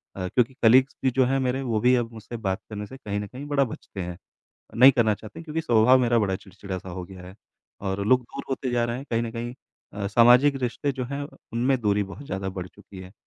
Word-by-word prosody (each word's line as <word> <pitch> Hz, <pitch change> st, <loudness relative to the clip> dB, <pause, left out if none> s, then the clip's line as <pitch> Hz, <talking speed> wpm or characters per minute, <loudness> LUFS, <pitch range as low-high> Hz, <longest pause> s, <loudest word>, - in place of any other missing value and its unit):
अ, 95 Hz, -1 st, -3 dB
क्योंकि 125 Hz, +6 st, +1 dB
कलीग्स 130 Hz, +4 st, +5 dB
भी 130 Hz, -, +4 dB
जो 130 Hz, +1 st, +3 dB
हैं 135 Hz, +2 st, +1 dB
मेरे 130 Hz, 0 st, 0 dB
वो 115 Hz, -5 st, -1 dB
भी 125 Hz, +4 st, +4 dB
अब 120 Hz, -2 st, -1 dB
मुझसे 115 Hz, +2 st, -8 dB
बात 95 Hz, -4 st, -2 dB
करने 105 Hz, -1 st, -5 dB
से 130 Hz, -, -11 dB
कहीं 105 Hz, -5 st, -4 dB
न 105 Hz, -, -5 dB
कहीं 130 Hz, +7 st, -9 dB
बड़ा 145 Hz, -1 st, +2 dB
बचते 110 Hz, -5 st, -7 dB
हैं, 90 Hz, -1 st, -5 dB, 0.6 s
नहीं 130 Hz, +4 st, +9 dB
करना 115 Hz, -4 st, +2 dB
चाहते 110 Hz, +1 st, -12 dB
हैं 165 Hz, -, -9 dB
क्योंकि 160 Hz, 0 st, -3 dB
स्वभाव 125 Hz, -3 st, +5 dB
मेरा 120 Hz, -1 st, +3 dB
बड़ा 100 Hz, -3 st, 0 dB
चिड़चिड़ा-सा 95 Hz, -1 st, -8 dB
हो 90 Hz, 0 st, -6 dB
गया 95 Hz, 0 st, -12 dB
है। 95 Hz, -, -11 dB, 0.5 s
और 100 Hz, 0 st, -2 dB
लोग 130 Hz, +2 st, +5 dB
दूर 120 Hz, -, -8 dB
होते 130 Hz, -1 st, -2 dB
जा 120 Hz, -1 st, +1 dB
रहे 120 Hz, 0 st, -2 dB
हैं 135 Hz, +3 st, -8 dB
कहीं 115 Hz, 0 st, +1 dB
न 115 Hz, -, -3 dB
कहीं 120 Hz, +1 st, -5 dB, 0.4 s
अ, 100 Hz, -1 st, -4 dB
सामाजिक 120 Hz, +7 st, +6 dB
रिश्ते 125 Hz, +3 st, -1 dB
जो 130 Hz, -1 st, -4 dB
हैं 140 Hz, +3 st, -4 dB, 0.3 s
उनमें 125 Hz, +3 st, +1 dB
दूरी 105 Hz, -2 st, +2 dB
बहुत 100 Hz, +9 st, -9 dB
ज़्यादा 95 Hz, -3 st, -3 dB
बढ़ 90 Hz, -, -4 dB
चुकी 100 Hz, 0 st, -14 dB
है। 95 Hz, 0 st, -12 dB
115 Hz, 245 wpm, -25 LUFS, 100-130 Hz, 0.6 s, नहीं